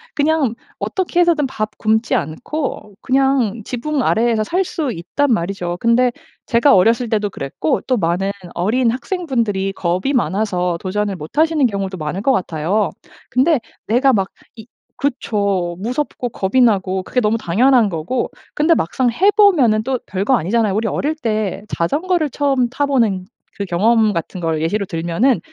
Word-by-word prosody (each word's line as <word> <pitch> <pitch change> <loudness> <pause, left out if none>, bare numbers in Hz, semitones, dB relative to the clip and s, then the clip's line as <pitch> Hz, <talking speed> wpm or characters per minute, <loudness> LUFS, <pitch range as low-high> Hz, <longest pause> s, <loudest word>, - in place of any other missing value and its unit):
그냥 290 -5 +1 0.3
어떻게 360 -2 0
해서든 330 -5 +3
밥 215 -4 -4
굶지 220 +2 +1
않고 210 - -4
그냥 260 -4 +1
지붕 270 +6 -2
아래에서 225 -1 +2
살 365 - 0
수 305 -6 -3
있단 240 +10 -1
말이죠. 175 -3 -1
근데 240 +3 +3 0.3
제가 245 +4 +4
어렸을 230 +6 +3
때도 210 -2 0
그랬고 145 -2 -2
또 255 - +2
많은 190 0 0 0.2
어린 230 +7 +1
학생 355 +9 -4
분들이 210 -9 0
겁이 185 +6 -1
많아서 190 -7 0
도전을 200 +1 -2
못 155 - -10
하시는 315 -3 +3
경우도 195 -4 -2
많을 155 +4 -4
것 265 +5 +3
같아요. 185 +1 0 0.4
근데 265 +4 +3 0.3
내가 250 +5 +3
막 195 -6 +1 0.3
이 220 0 -11 0.3
그쵸 200 -10 -1
무섭고 250 +4 -3
겁이 220 +1 -1
나고 190 -5 +2
그게 250 - -1
너무 220 +1 +1
당연한 230 +5 +3
거고. 180 +8 -2 0.2
근데 310 +3 +3
막상 245 - 0
해 370 - +3
보면은 300 - +4
또 260 +2 -1
별거 200 +7 +1
아니잖아요. 215 +1 +1
우리 220 +1 0
어릴 305 +2 -1
때 215 - -2
자전거를 310 - 0
처음 270 -2 +1
타 265 +4 -1
보는 230 -9 +1 0.3
그 200 - -2
경험 215 +4 +2
같은 175 0 -4
걸 160 -2 -1
예시로 200 +6 0
들면은 170 +9 +1
225 Hz, 320 characters per minute, -18 LUFS, 190-265 Hz, 0.4 s, 제가